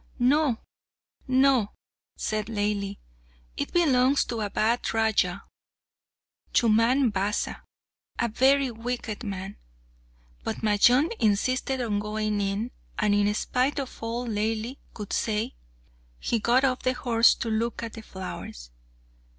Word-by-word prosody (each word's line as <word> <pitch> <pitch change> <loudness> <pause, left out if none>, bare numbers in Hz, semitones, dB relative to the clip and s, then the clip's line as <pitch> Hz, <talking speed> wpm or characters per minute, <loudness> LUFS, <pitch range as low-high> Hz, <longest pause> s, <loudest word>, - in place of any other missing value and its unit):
"No, 265 0 +3 0.7
no," 260 -4 +3 0.4
said 215 -1 -2
Laili; 205 -2 -2 0.6
"it - - -3
belongs 275 -5 +3
to 230 -2 -3
a 205 - -1
bad 225 +4 0
Raja, 200 -4 +1 1.1
Chumman 235 +3 +4
Basa, 205 +1 -1 0.6
a 235 - +1
very 265 +3 +3
wicked 230 -1 -4
man." 195 -1 -5 0.9
But - - -4
Majnun 245 - +4
insisted 255 +5 +1
on 215 -4 0
going 210 0 -1
in, 200 +5 -2 0.3
and 210 -2 +2
in 205 0 +3
spite 255 +6 0
of 270 -2 -4
all 230 +2 -3
Laili 225 +3 -2 0.2
could 210 -3 -6
say, 220 +3 -1 0.7
he 235 - 0
got 240 +4 +3
off 255 -2 +1
the 255 - +1
horse 235 -2 +4
to 230 - -3
look 230 +2 -1
at 230 - -5
the 225 - -8
flowers. 185 - -8
225 Hz, 125 wpm, -26 LUFS, 210-250 Hz, 1.1 s, Chumman